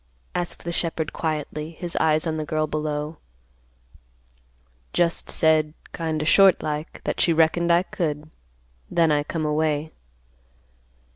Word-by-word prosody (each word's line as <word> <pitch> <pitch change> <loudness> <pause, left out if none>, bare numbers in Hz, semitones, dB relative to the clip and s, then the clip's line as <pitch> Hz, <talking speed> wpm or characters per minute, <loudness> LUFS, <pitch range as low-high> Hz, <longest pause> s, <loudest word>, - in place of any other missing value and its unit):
asked 175 -1 -2
the 170 - -3
shepherd 165 -2 -1
quietly, 155 -1 -3
his 170 +1 -2
eyes 155 0 +2
on 160 -1 -1
the 155 - -2
girl 155 +1 -1
below. 150 0 -3 1.8
"Just 170 -1 +1
said, 155 -1 +2 0.2
kind 160 -2 -2
o' - - -4
short 195 +3 +5
like, 150 +1 -4
that - - -2
she 170 - +4
reckoned 165 +1 +3
I 170 +1 +4
could. 155 -4 -3 0.6
Then 165 -2 +3
I 145 -1 +3
come 155 +1 -3
away." 150 0 0
155 Hz, 135 wpm, -24 LUFS, 150-165 Hz, 1.8 s, short